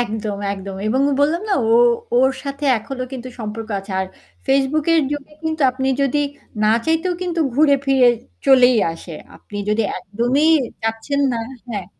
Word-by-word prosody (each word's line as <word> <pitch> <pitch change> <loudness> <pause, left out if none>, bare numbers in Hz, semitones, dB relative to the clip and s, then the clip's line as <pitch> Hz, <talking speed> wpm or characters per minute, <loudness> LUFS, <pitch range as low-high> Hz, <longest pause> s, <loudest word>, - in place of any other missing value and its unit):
একদম, 215 -3 -3 0.2
একদম 195 0 -7
এবং 250 +5 +1 0.2
বললাম 315 +5 +2
না - - +1 0.2
ও - - +5 0.4
ওর 265 +1 +4
সাথে 280 +1 -5
এখনো 255 +4 -6
কিন্তু 255 -1 -6
সম্পর্ক 220 0 -6
আছে। 195 0 -9
আর 190 - -2 0.4
Facebook 275 +3 +2
এর 330 - +5
যুগে 290 0 -5
কিন্তু 315 -1 -1
আপনি 265 +1 -2
যদি 275 +1 +1 0.4
না 215 - +4 0.2
চাইতেও 325 +3 +1
কিন্তু 345 -2 -2
ঘুরে 290 +1 +5
ফিরে 265 -2 +5 0.4
চলেই 255 -2 +6 0.2
আসে। 165 +1 -10 0.2
আপনি 205 - -11
যদি 215 +2 +2
একদমই 235 +11 0 0.4
যাচ্ছেন 225 +6 -1
না, 235 - -2 0.3
হ্যাঁ। 200 -6 -4
255 Hz, 160 wpm, -20 LUFS, 220-285 Hz, 0.4 s, চলেই